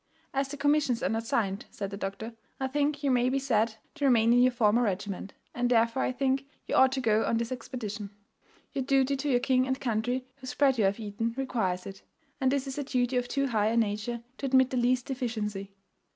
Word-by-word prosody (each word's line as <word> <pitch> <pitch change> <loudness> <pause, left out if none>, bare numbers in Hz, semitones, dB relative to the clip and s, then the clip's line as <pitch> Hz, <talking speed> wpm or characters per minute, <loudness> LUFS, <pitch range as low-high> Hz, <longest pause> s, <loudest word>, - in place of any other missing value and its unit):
"'As 275 0 0
the 290 +1 -7
commissions 290 -5 +2
are - - +1
not 225 0 -2
signed,' 200 -4 -1
said 200 -1 -5
the - - -4
doctor, 200 +3 -5 0.3
'I 265 - 0
think 290 +1 0
you 275 - +2
may 250 0 +3
be 270 - +1
said 230 -5 +1 0.2
to 295 -3 -2
remain 235 -3 +5
in 245 - +5
your 255 0 +5
former 235 -1 +3
regiment; 195 -2 -2 0.2
and 245 0 0
therefore 230 +1 +3
I - - +1
think 270 +1 0 0.2
you - - -4
ought 265 0 +6
to 270 - -1
go 220 -3 +2
on 230 - +1
this 235 +1 -2
expedition; 220 -5 -5 0.6
your 275 -2 -1
duty 270 +1 +2
to 280 +2 -2
your 245 -3 +3
king 255 0 +2
and 260 +1 -1
country, 245 +2 -1
whose 270 +1 -7
bread 270 -4 +3
you 210 - +4
have 195 +3 +1
eaten, 225 +2 -3
requires 205 -9 -1
it; 195 0 -9 0.4
and 260 -1 +2
this 275 -1 0
is 270 +1 -5
a - - -1
duty 255 -2 0
of 245 -1 0
too 275 +2 0
high 215 -5 +1
a 230 +2 +1
nature 225 +2 -1 0.2
to 275 - -2
admit 260 -1 +4
the 255 - -1
least 245 0 +2
deficiency. 215 -6 -3
245 Hz, 225 wpm, -29 LUFS, 220-265 Hz, 0.6 s, ought